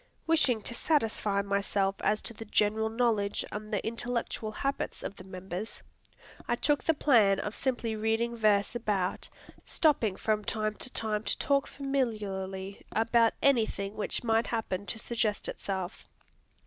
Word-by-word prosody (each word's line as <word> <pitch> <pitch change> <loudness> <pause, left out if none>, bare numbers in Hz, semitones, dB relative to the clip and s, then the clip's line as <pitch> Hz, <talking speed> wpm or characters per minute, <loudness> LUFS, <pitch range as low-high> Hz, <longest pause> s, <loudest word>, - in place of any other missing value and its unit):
Wishing 275 -9 +3
to 235 - -2
satisfy 220 -8 +1
myself 200 0 +1
as 210 0 +1
to - - -4
the 225 - -8
general 215 +1 +2
knowledge 220 -3 +1
and 215 +1 -6
the 205 - -1
intellectual 230 -1 -2
habits 275 +6 -3
of 200 - -5
the 185 - -11
members, 190 +2 -6 0.6
I 240 - +2
took 290 +4 +1
the 325 - +2
plan 220 -10 +4
of 210 - -3
simply 240 -4 -1
reading 225 +2 0
verse 210 -2 +3
about, 205 -6 -1 0.3
stopping 275 - +2
from 215 0 0
time 215 0 -1
to 250 - -4
time 215 -1 -1
to - - 0
talk 280 -1 +2
familiarly 205 -8 -3
about 230 +1 +3
anything 220 -6 +2
which 215 - -1
might 225 0 +2
happen 205 -4 -2
to - - -2
suggest 225 -2 0
itself. 190 -1 -4
220 Hz, 150 wpm, -30 LUFS, 200-235 Hz, 0.6 s, plan